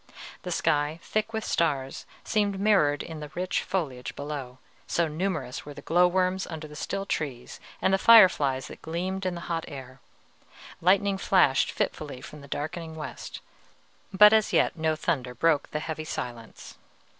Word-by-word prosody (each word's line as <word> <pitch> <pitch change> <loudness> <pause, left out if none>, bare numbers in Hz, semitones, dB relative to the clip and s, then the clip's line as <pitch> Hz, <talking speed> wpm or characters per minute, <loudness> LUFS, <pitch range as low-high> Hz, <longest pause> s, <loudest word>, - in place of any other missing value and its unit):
The - - -6
sky, 150 +2 0
thick 215 +1 -1
with 220 -1 -3
stars, 140 -5 -1 0.2
seemed 205 -3 0
mirrored 195 -9 +3
in 160 -2 -8
the 150 -1 -7
rich 180 +1 -1
foliage 135 -10 -3
below, 140 -3 -6 0.3
so 170 -1 +1
numerous 155 -5 -3
were 145 -1 -10
the 145 - -10
glow 175 +2 +4
worms 185 +1 0
under 160 -2 -7
the 150 - -12
still 195 +5 -3
trees, 135 -9 -4 0.2
and 190 - +3
the 195 - +3
fireflies 165 - +6
that - - -11
gleamed 185 +4 -3
in 180 - -2
the 170 - -6
hot 165 -1 -3
air. 130 -2 -9 0.8
Lightning 195 +2 +3
flashed 180 -9 +3
fitfully 145 -4 -3
from 150 +3 -11
the 140 - -12
darkening 160 +3 -5
west; 155 - -7 0.7
but 210 +2 +8
as 220 -1 +3
yet - - +2
no 160 -1 0
thunder 130 -6 -2
broke 155 +2 +2
the 150 - -3
heavy 155 0 -5
silence. 120 -6 -7
160 Hz, 165 wpm, -27 LUFS, 145-190 Hz, 0.8 s, but